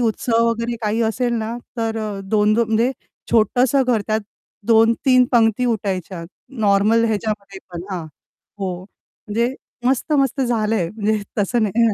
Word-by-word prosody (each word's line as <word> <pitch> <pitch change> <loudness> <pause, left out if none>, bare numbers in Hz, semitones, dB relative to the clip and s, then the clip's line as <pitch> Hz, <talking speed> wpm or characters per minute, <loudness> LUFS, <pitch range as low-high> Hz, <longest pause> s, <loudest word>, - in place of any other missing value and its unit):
उत्सव 230 0 +1
वगैरे 230 +1 -2
काही 215 +1 0
असेल 240 +2 0
ना, 225 +1 -3 0.2
तर 225 -1 -1
अ, 210 -2 -4
दोन 210 0 +3
दो 235 +1 +3
म्हणजे 225 +3 +1 0.4
छोटंसं 245 +4 +3
घर, 240 -3 +2
त्यात 215 0 0 0.5
2-3 230 +3 +4
पंगती 230 0 +3
उठायच्या 190 -6 -2 0.4
नॉर्मल 210 +2 +3
ह्याच्यामध्ये 210 -3 -2
पण, 170 -1 -5
हां, 180 -3 -4 0.5
हो. 185 -3 -3
म्हणजे 230 +4 -4 0.3
मस्त-मस्त 275 +1 +1
झालंय, 220 -6 0
म्हणजे 215 -1 0 0.2
तसं 220 +3 +1
नाही. 220 +2 +2
225 Hz, 135 wpm, -20 LUFS, 210-235 Hz, 0.5 s, 2-3